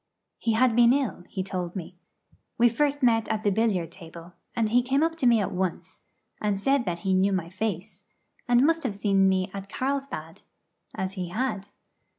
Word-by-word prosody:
He 225 - 0
had 235 +1 +3
been 240 0 +6
ill, 260 -10 -2
he 190 - -3
told 180 -2 -4
me. 180 -1 -7 0.6
We 235 - +4
met 230 - -11
first 290 0 +1
at 225 -2 +2
the 205 - +2
billiard 190 -6 0
table, 170 -1 -12 0.2
and 225 -2 +1
he 245 +3 +4
came 270 +4 +1
up 325 0 0
to 265 - +2
me 235 -2 +5
at 200 - -1
once, 185 -2 -3 0.4
and 205 -2 0
said 270 +3 +1
that 175 -2 -3
he 190 - +2
knew 190 +2 +3
my 180 -3 -2
face, 195 0 -4 0.4
and 245 +2 +4
must 330 +1 +2
have 245 -8 -3
met 200 - +2
me 190 -1 +3
at 195 0 -7
Carlsbad, 275 +3 -4 0.5
as 190 0 -3
he 185 -2 -4
had. 205 -1 -2
210 Hz, 190 wpm, -26 LUFS, 185-245 Hz, 0.6 s, been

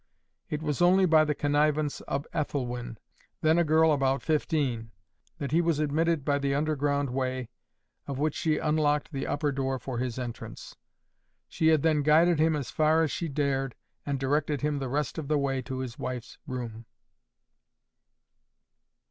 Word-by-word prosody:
It 150 +1 -3
was 150 +1 -1
only 185 +2 +5
by 160 -3 +5
the 150 -1 0
connivance 145 0 +1
of 140 +2 -2
Ethelwyn, 125 -5 -3 0.4
then 160 +2 +4
a - - +4
girl 160 0 +4
about 135 -2 +1
fifteen, 140 -7 0 0.5
that 140 -5 -4
he 165 +3 +4
was 165 -3 +1
admitted 155 0 +1
by 145 -1 +2
the 140 0 0
underground 145 -2 0
way, 130 -1 -2 0.6
of 140 - -4
which 150 +1 0
she 155 -2 0
unlocked 150 -1 +1
the 135 -2 -3
upper 145 0 0
door 135 -1 -1
for 125 -1 -5
his 125 -1 -3
entrance. 120 -3 -7 0.7
She 160 - 0
had 155 -3 +4
then 155 -2 +3
guided 160 +3 +4
him 160 0 +3
as 145 -4 -4
far 155 +1 +3
as 155 - 0
she 170 - -2
dared, 135 -3 -1 0.3
and 140 -2 -2
directed 145 +1 0
him 150 -1 0
the 135 -2 -3
rest 150 +4 -2
of 150 - -5
the 150 0 +2
way 135 -2 0
to 130 +1 -6
his 130 -2 -5
wife's 125 -2 -5
room. 120 -4 -6
145 Hz, 165 wpm, -28 LUFS, 135-155 Hz, 0.7 s, only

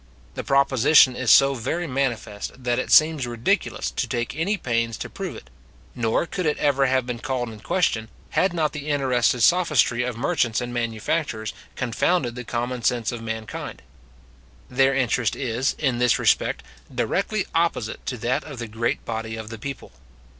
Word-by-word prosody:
The - - -5
proposition 135 -1 +5
is 125 -2 -1
so 140 0 +7
very 135 +8 -2
manifest, 125 -4 -3
that 120 0 +1
it - - -3
seems 155 -4 +5
ridiculous 120 0 -1
to - - -2
take 120 +2 -3
any 185 +7 0
pains 115 - -1
to - - -6
prove 190 -9 -5
it; - - -13 0.4
nor 115 +6 0
could 180 0 -3
it 150 - +1
ever 140 -2 +2
have 130 -1 +1
been 125 -1 -4
called 130 -3 -2
in 110 -1 -10
question, 110 - 0 0.2
had 190 - +2
not 160 -3 0
the 150 -1 -6
interested 130 -4 +2
sophistry 150 -6 +3
of 125 -2 -3
merchants 125 -4 +1
and 120 0 -5
manufacturers 115 -1 -2 0.2
confounded 125 +2 0
the 125 +1 -6
common 120 +2 -3
sense 115 -1 +1
of 120 -2 -6
mankind. 110 -1 -6 0.9
Their 135 +1 +3
interest 125 -3 +1
is, 130 0 -1
in 130 -5 0
this 125 -1 +3
respect, - - +1 0.3
directly 200 0 -1
opposite 165 -9 0
to 125 - -2
that 120 +3 -1
of 145 -4 -9
the 120 -1 -5
great 115 +2 -2
body 110 -1 -4
of 110 -1 -7
the 115 -1 -8
people. 135 +4 -7
125 Hz, 170 wpm, -24 LUFS, 115-140 Hz, 0.9 s, so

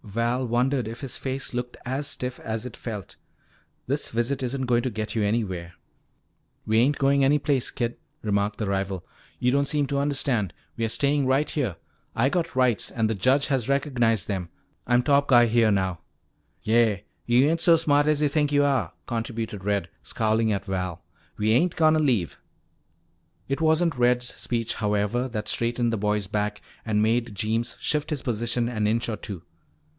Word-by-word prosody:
Val 115 +4 -1
wondered 125 +1 +1
if 115 +2 -7
his 135 -3 -6
face 135 -1 -4
looked 125 0 -4
as 135 +3 -2
stiff 125 -3 -4
as 110 +1 -4
it 125 - -7
felt. 105 -6 -7 0.7
"This 140 +3 -1
visit 120 +4 -1
isn't 130 +1 -2
going 120 -1 +2
to 130 - -1
get 110 -1 -4
you 110 - +1
anywhere." 95 -6 -1 0.9
"We 110 +1 +3
ain't 135 +4 +3
goin' 140 0 +3
any 140 +2 +4
place, 140 -3 +1
kid," 120 -2 -3 0.3
remarked 100 -1 0
the 105 - -2
rival. 95 -2 -2 0.3
"You 125 - +2
don't 140 +1 +2
seem 145 0 +1
to 140 +1 -1
understand. 135 - 0 0.2
We're 115 -1 -1
stayin' 140 +3 +1
right 135 +3 +2
here. 125 - -1 0.4
I 130 +4 +3
got 170 -3 -2
rights 125 -5 +2
and 115 -3 0
the 110 - 0
judge 130 +8 +2
has 135 -4 -1
recognized 125 -6 +1
them. 95 -4 -3 0.4
I'm 120 +1 +3
top 140 0 +3
guy 120 -2 +6
here 115 -1 +3
now." 95 -3 0 0.6
"Yeah. 110 -3 +3 0.3
Yuh 125 +4 +5
ain't 165 0 0
so 170 -1 +7
smart 145 -2 +3
as 150 -1 +2
yuh - - +4
think 145 0 +1
yuh 145 0 +4
are," 140 -2 0
contributed 115 -3 -4
Red, 100 0 0
scowling 110 0 +1
at 100 -2 -2
Val. 90 -3 -3 0.3
"We 105 +1 +1
ain't 165 +10 +3
gonna 155 -1 +4
leave." 120 - 0 1.1
It 135 +3 -2
wasn't 160 +1 +3
Red's 125 0 +2
speech, 115 -2 -2
however, 105 +4 0
that 105 -3 -4
straightened 120 +1 0
the - - 0
boy's 105 0 0
back 105 0 -2 0.2
and 105 -1 +1
made 115 0 0
Jeems 115 +3 -1
shift 150 -1 -1
his 150 -4 -3
position 120 0 0
an 110 -3 -1
inch 115 +2 0
or 115 - -2
two. 95 -4 -7
120 Hz, 180 wpm, -25 LUFS, 110-135 Hz, 1.1 s, so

